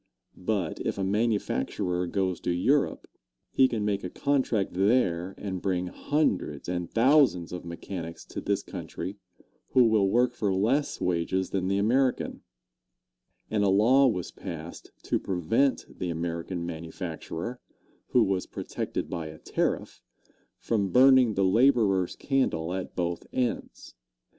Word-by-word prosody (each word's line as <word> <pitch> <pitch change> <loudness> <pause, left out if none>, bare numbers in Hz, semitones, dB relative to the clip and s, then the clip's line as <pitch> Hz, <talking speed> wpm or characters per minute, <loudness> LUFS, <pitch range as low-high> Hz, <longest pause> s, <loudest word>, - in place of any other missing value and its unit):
But 90 -3 -2
if - - -2
a 100 - -1
manufacturer 95 - 0
goes 95 -1 -1
to - - -2
Europe, 135 +12 +1 0.5
he 130 - +5
can 110 -4 -2
make 100 -1 -1
a 90 - -3
contract 130 -5 0
there 95 -3 +1
and 95 -3 -4
bring 90 -2 0
hundreds 95 - -1
and 90 -1 -2
thousands 125 - +3
of 90 - -5
mechanics 85 -1 -7
to - - -6
this - - -1
country 100 +2 -6 0.6
who 130 - +7
will 110 -4 +3
work 120 +3 +3
for 105 -5 -1
less 125 +10 +1
wages 90 +1 0
than 95 -2 -1
the 100 +1 +1
American, 125 +6 +1 1.1
and 105 -2 +2
a 100 - +3
law 120 +8 +5
was 90 -8 -2
passed 85 -3 -8
to - - 0
prevent 95 - +1
the 90 - -2
American 85 +1 -3
manufacturer, 85 +6 -6 0.5
who 125 - +4
was 95 -3 -1
protected - - -4
by 80 -2 -4
a 80 0 -9
tariff, - - -2 0.6
from 100 -4 0
burning 130 0 +6
the 95 - +2
laborer's 105 -4 +3
candle 90 - 0
at 95 0 -5
both 85 -1 -2
ends. 125 -2 -3
95 Hz, 140 wpm, -27 LUFS, 90-120 Hz, 1.1 s, who